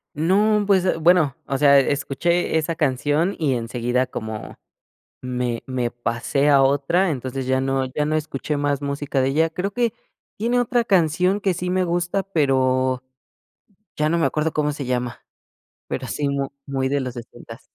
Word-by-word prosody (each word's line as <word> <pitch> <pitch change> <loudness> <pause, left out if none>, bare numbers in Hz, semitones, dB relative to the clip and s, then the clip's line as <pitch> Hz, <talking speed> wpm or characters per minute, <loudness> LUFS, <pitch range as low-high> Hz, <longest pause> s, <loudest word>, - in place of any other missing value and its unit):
No, 205 +7 +3
pues, 190 -2 +3
eh, 185 - +1
bueno, 165 -4 +3
o 135 -1 -2
sea, 140 -1 +6
escuché 155 +5 0
esa 160 +1 -1
canción 150 +4 0
y 145 -5 +1
enseguida 120 +2 -1
como 110 -1 -6 0.7
me 125 -2 -2
me 125 -2 -2
pasé 120 +4 -1
a 140 -2 +6
otra, 145 +7 +2
entonces 130 -2 -4
ya 130 0 +1
no 135 0 0
ya 150 0 0
no 155 - +1
escuché 150 -1 -3
más 145 0 0
música 140 -1 -2
de 130 - +2
ella. 160 +4 +2
Creo 185 +4 -3
que 235 0 0 0.5
tiene 235 +3 +1
otra 240 -1 +1
canción 180 +1 +2
que 195 -2 +1
sí 180 +1 -4
me 185 0 +1
gusta, 175 +2 -1
pero 130 -7 +1 0.9
ya 150 0 +1
no 170 - +1
me 160 - +3
acuerdo 155 +1 -1
cómo 150 -1 0
se 145 -1 -5
llama, 125 -1 -3 0.6
pero, - - -4
sí 145 -1 -2
mu 140 -1 -1 0.2
muy 135 -1 -1
de 140 -1 0
los 125 -2 -4
sesentas. 120 -1 -11
145 Hz, 170 wpm, -22 LUFS, 130-175 Hz, 0.9 s, sea